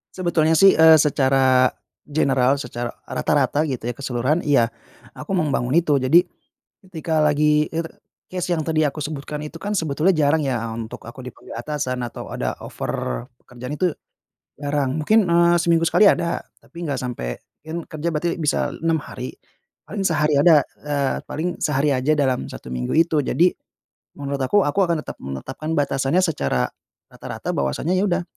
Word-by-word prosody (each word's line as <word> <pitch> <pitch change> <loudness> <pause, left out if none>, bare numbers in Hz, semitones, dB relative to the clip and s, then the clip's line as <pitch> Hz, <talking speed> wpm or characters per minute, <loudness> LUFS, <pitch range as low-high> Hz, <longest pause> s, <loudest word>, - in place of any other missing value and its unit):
Sebetulnya 165 -3 +2
sih, 195 +4 +7
eee, 160 0 +9
secara 135 -3 +4 0.4
general, 135 -3 +2
secara 120 -3 -5 0.2
rata-rata 145 +1 0
gitu, 130 -5 -4
ya, 120 - -1
keseluruhan, 130 +4 -1
iya, 120 -6 +3 0.4
aku 150 +6 -5
mau 180 - +2
membangun 135 -2 0
itu. 155 -4 +3
Jadi, 135 +7 +5 0.6
ketika 160 -3 -2
lagi 150 0 +3
it 165 +1 -3 0.5
case 180 -1 -3
yang 160 - -1
tadi 155 -1 +1
aku 150 +1 -4
sebutkan 150 0 -5
itu 150 +2 -8
kan 205 +5 -3
sebetulnya 160 +1 +1
jarang 155 0 +3
ya, 125 -4 -1
a 115 - -4
untuk 110 0 -7
aku 115 +3 -11
dipanggil 125 - -12
atasan, 130 -1 -3
atau - - -8
ada - - -2
offer - - -4 0.2
pekerjaan 125 +3 -7
itu 180 +4 +1 0.7
jarang. 145 -2 -1
Mungkin, 215 +3 +4
eee, 170 0 +4
seminggu 170 -1 +2
sekali 185 +5 +5
ada, 170 -3 +2 0.2
tapi 170 -1 -8
nggak 140 -3 -2
sampai 60 - -4 0.3
kan 165 +2 -4
kerja 155 +1 -4
berarti 170 +3 0
bisa 150 -3 0
6 165 -1 0
hari, 125 0 -7 0.5
paling 200 -1 -4
sehari 150 -3 +2
ada 150 -1 +6 0.2
eee, 140 -2 0
paling 175 +3 -3
sehari 150 0 +1
aja 135 +3 +2
dalam 130 -4 0
1 65 - -9
minggu 60 0 -2
itu. 160 -1 +3
Jadi, 170 +5 +2 0.7
menurut 140 -1 -3
aku, 200 +8 +3
aku 150 +7 +1
akan 170 -3 +1
tetap - - -7
menetapkan 100 - -6
batasannya 135 +3 +1
secara 70 - 0 0.4
rata-rata - - -6
bahwasanya, 70 - -1
ya 185 - +2
udah, 175 +1 +1
150 Hz, 165 wpm, -22 LUFS, 130-165 Hz, 0.7 s, eee